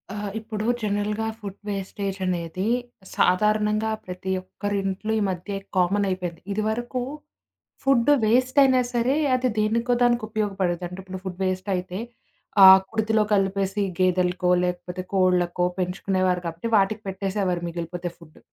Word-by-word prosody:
ఆ! - - -5 0.2
ఇప్పుడు 215 -1 -5 0.2
జనరల్‌గా 210 +1 -1
ఫుడ్ 200 -3 -7
వేస్టేజనేది 190 -2 -3 0.5
సాధారణంగా 210 +3 +2 0.2
ప్రతి 185 +1 -5
ఒక్కరి 205 +2 -4
ఇంట్లో 195 +3 -2
ఈ - - 0
మధ్య 190 +2 -4 0.2
కామన్ 195 +3 +2
అయిపోయింది. 180 -3 -4
ఇదివరకు 220 +5 -2 0.8
ఫుడ్డు 270 0 +4
వేస్టయినా 255 +3 +4
సరే, 245 +3 +1 0.2
అది 255 0 +1
దేనికో 230 +3 +1
దానికి 240 -1 +3
ఉపయోగపడేది. 195 -5 -1
అంటే 180 +1 -9
ఇప్పుడు 190 0 -8
ఫుడ్ 185 -2 -6
వేస్టయితే, 185 0 -2 0.6
ఆహ్, 190 0 +10
కుడితిలో 220 -1 +1
కలిపేసి 195 0 0 0.2
గేదెలకో, 180 0 +2
లేకపోతే 180 0 -4
కోళ్లకో, 180 -1 +2
పెంచుకునేవారు 185 0 0
కాబట్టి, 170 +7 -4
వాటికి 205 +2 +1
పెట్టేసేవారు 190 -2 -1
మిగిలిపోతే 175 +1 -5
ఫుడ్. 160 -2 -17
195 Hz, 120 wpm, -24 LUFS, 180-215 Hz, 0.8 s, ఆహ్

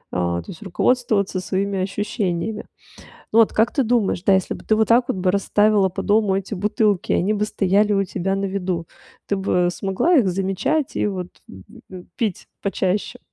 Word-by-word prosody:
а, 85 -1 0
то - - -9
есть 160 - -12
руководствоваться 200 0 0
своими 195 +1 -2
ощущениями. 200 0 -2 0.7
Ну 225 - +6
вот 225 - +4
как 220 +2 +2
ты 275 - +1
думаешь, 220 -6 +1
да, 195 0 +4
если 190 -1 0
бы - - -12
ты 220 - +2
вот 220 0 +3
так 240 +2 +5
вот 260 - -1
бы 185 0 +1
расставила 205 0 +3
по 185 - -5
дому 205 -2 +2
эти 195 +2 -4
бутылки, 205 0 0
они 205 +4 +1
бы 210 0 0
стояли 205 0 +1
у 195 -1 +2
тебя 190 +1 -2
на 195 - -2
виду, 185 -3 -3 0.4
ты 200 - 0
бы 180 -2 +1
смогла 195 - 0
их 245 - +4
замечать 195 - -1
и - - +1
вот, 185 -3 -4 0.2
э - - -13 0.4
э - - -9
э, - - -13
пить 215 -6 -2 0.2
почаще? 195 0 -1
195 Hz, 195 wpm, -21 LUFS, 185-215 Hz, 0.7 s, Ну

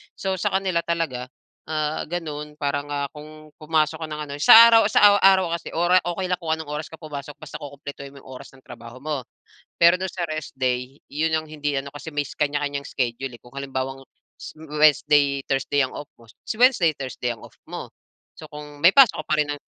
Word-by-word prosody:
So 190 -1 -3
sa 190 - -1
kanila 190 -3 +1
talaga, 160 -8 -3 0.4
ah, 155 -1 -2
gano'n 150 -3 -5
parang, 145 -1 -2
ah, 140 -1 -2
kung 155 0 -13
pumasok 155 0 0
ka - - -9
ng 150 0 -6
ano - - -5
sa 230 +10 +9
araw 225 -1 +6
sa 205 -1 +6
araw 190 -2 +5
kasi 170 - -11
ora 175 +2 +3
okey 180 +1 -3
lang 180 - 0
kung 165 -3 -2
anong 160 -2 -5
oras 150 +1 -4
ka - - -6
pumasok 145 -2 -7
basta 155 - -8
kukumpletuhin 140 -1 -9
mo 140 - -13
'yong - - -16
oras - - -13
ng 130 - -18
trabaho 115 +2 -12
mo. 145 -4 -4 0.5
Pero 170 +1 +6
do'n 185 0 -4
sa 175 -1 -3
rest 155 -1 -5
day, 125 +1 -2
'yon 155 +3 -1
ang 155 - -7
hindi 150 -2 -3
ano, 135 +1 -6
kasi 145 +2 -8
may 145 -1 -1
kaniya-kaniyang 145 0 -2
schedule, 125 +1 -3
eh, 120 - -13
kung 120 +2 -18
halimbawang 135 -1 -4 0.7
Wednesday, 150 -2 +3
Thursday 135 +1 0
ang 130 - -3
off 145 - -7
mo, 115 - -18 0.2
si - - -3
Wednesday, 240 -11 +5
Thursday 130 -3 -4
ang 115 - -18
off - - -14
mo. - - -7 0.5
So - - -9
kung 150 0 -10
may 175 - +8
pasok 255 - +6
ka - - -35
pa - - +1
rin 150 - +2
ng - - -10
150 Hz, 210 wpm, -23 LUFS, 140-165 Hz, 0.7 s, sa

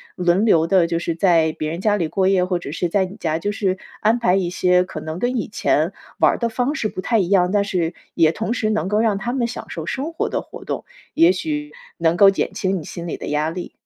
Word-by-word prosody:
轮 180 +3 +2
流 165 -7 +4
的， 170 0 +3
就 170 - -1
是 170 0 -2
在 165 -2 +3
别 155 0 -4
人 170 +3 -5
家 210 0 +2
里 170 -5 -1
过 190 +4 0
夜， 185 -2 +3
或 180 -1 0
者 175 -5 -7
是 170 +3 -1
在 190 +3 +1
你 185 +2 -7
家， 160 -1 -1
就 205 +5 -2
是 195 -2 -1 0.2
安 220 +2 +3
排 235 -7 +2
一 180 -3 0
些 180 0 +3
可 - - -7
能 155 +2 -5
跟 245 +4 0
以 240 - -2
前 - - +1 0.3
玩 - - +5
儿 - - -3
的 235 - 0
方 245 +5 -1
式 235 -8 -1
不 185 - -6
太 225 +3 +1
一 185 - +1
样， 180 -1 +3
但 205 0 +2
是 175 -4 -1 0.2
也 160 -1 +4
同 225 +5 -2
时 220 -3 -1
能 215 -3 0
够 210 - +1
让 220 -3 +2
他 240 +4 -3
们 255 -3 0
享 235 - -6
受 - - -5
生 295 +5 -3
活 - - -1
的 - - -1
活 - - -11
动， - - -4 0.3
也 170 +2 +5
许 150 -4 -4 0.2
能 165 0 +2
够 195 +2 +7
减 195 - -1
轻 195 -1 -1
你 155 - -9
心 170 -1 -7
里 - - -4
的 - - -7
压 150 +1 0
力。 175 +2 -6
185 Hz, 290 characters per minute, -21 LUFS, 170-210 Hz, 0.3 s, 够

